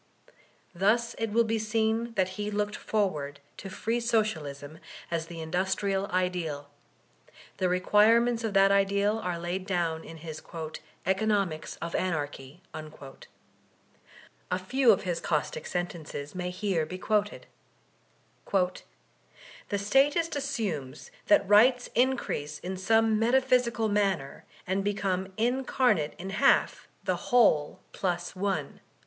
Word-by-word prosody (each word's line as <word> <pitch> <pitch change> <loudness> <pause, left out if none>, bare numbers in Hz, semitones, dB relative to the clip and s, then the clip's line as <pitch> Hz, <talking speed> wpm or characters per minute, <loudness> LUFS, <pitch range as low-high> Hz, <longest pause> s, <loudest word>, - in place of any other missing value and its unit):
Thus 215 +6 +2
it 225 0 -1
will 235 +2 +4
be 225 0 -1
seen 220 +1 0
that 190 -2 +2
he 205 +2 -4
looked 210 0 -1
forward 150 -10 -2 0.2
to 195 - -7
free 225 +5 -2
Socialism 160 - -2 0.3
as 165 -1 -2
the 165 -1 -7
industrial 190 +4 -1
ideal; 175 -6 -2 0.9
the 185 - +1
requirements 225 +6 +4
of 215 -3 -2
that 195 0 +6
ideal 200 +2 +2
are 180 -5 -3
laid 175 +3 -4
down 170 -4 -1
in 165 - -10
his 160 -1 -8 0.6
"Economics 190 -4 0
of 170 - -4
Anarchy." 150 -2 -3 1.9
A 180 - +1
few 240 +7 +3
of 195 - +1
his 175 -3 -2
caustic 155 -1 -2
sentences 165 -5 -4
may 180 -1 -3
here 180 -4 -1
be 185 - -6
quoted: 210 +1 -1 1.1
'The 185 -2 +1 1.0
Statist 285 - +2
assumes 230 - -4 0.2
that 300 -11 +4
rights 245 +5 +5
increase 235 - 0
in 185 +2 -5
some 220 +3 +2
metq>hysical 240 -1 +2
manner, 195 -9 -1 0.2
and 190 +2 -1
become 195 -2 -1
incarnate 245 - +1
in 190 +2 -6
half 270 +8 +2 0.2
the - - 0
whole 180 -12 +3
plus 175 -1 -2
one." 195 +1 -2
195 Hz, 120 wpm, -28 LUFS, 175-225 Hz, 1.9 s, that